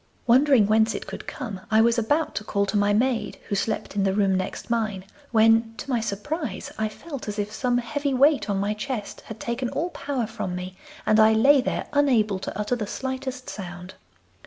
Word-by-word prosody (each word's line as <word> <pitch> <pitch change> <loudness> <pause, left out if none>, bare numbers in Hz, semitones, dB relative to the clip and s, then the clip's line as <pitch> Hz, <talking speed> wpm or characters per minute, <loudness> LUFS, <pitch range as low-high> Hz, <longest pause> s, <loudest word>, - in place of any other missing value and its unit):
Wondering 255 -2 +5
whence 220 +1 +3
it - - -5
could - - -8
come, 215 -9 -6
I 220 -1 +4
was 235 +1 +4
about 295 +8 0
to - - -3
call 200 -1 0
to 200 - -3
my 205 0 +3
maid 235 +3 0
who - - -2
slept 195 +1 -2
in 200 - +1
the 195 0 +1
room 200 -2 +3
next 185 0 -3
mine, 215 -5 -1 0.2
when, 225 0 +4
to - - -7
my 240 - +2
surprise, 225 - -4
I 220 0 -1
felt 280 +3 -8
as 210 0 -4
if 205 0 -2
some 245 +1 +1
heavy 285 +4 -2
weight 275 -1 +3
on 200 - +1
my 200 +2 0
chest 215 -1 -5
had 220 0 -9
taken 240 +1 -2
all 345 +7 -2
power 275 -6 -2
from 215 -5 -4
me, 180 +1 -6 0.3
and 215 - +4
I 220 0 +7
lay 270 +5 +5
there - - -2
unable 235 -9 +3
to 190 - -6
utter 210 +4 0
the 215 -4 -4
slightest 260 +1 -4
sound. 180 -1 -7
225 Hz, 205 wpm, -25 LUFS, 205-260 Hz, 0.3 s, I